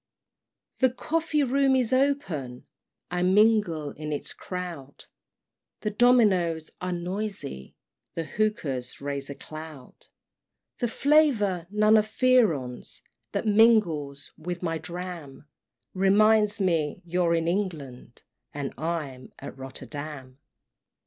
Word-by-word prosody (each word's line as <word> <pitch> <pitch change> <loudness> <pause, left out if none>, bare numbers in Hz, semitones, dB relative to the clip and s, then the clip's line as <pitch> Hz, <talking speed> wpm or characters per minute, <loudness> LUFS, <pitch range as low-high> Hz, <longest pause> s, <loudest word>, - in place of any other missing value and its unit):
VI. 260 - +6
The 250 - -6
coffee 315 -1 0
room 270 +1 +3
is 255 -1 +1
open 195 - 0 0.5
I 180 0 -1
mingle 185 -6 +3
in 150 0 -6
its 145 - -4
crowd, 175 -7 -7 0.8
The 210 - -1
dominos 200 -9 +3
are 180 0 -2
noisy 180 - -5 0.4
The 165 - -2
hookahs 155 - -2
raise 140 -1 -4
a 140 - -5
cloud; 155 -4 -11 0.7
The 240 - +1
flavor, 225 - +2
none 215 +2 +4
of 215 0 +2
Fearon's, 215 - +1 0.3
That - - -1
mingles 205 -11 +3
with 175 +2 -5
my 165 -2 -1
dram, 170 -4 -7 0.5
Reminds 210 +3 +4
me 165 -6 0
you're 175 0 +1
in 165 0 0
England, 155 - -4 0.3
And 140 -2 -4
I'm 150 -6 -4
at 140 - -8
Rotterdam. 135 0 -7
175 Hz, 110 wpm, -26 LUFS, 145-215 Hz, 0.8 s, VI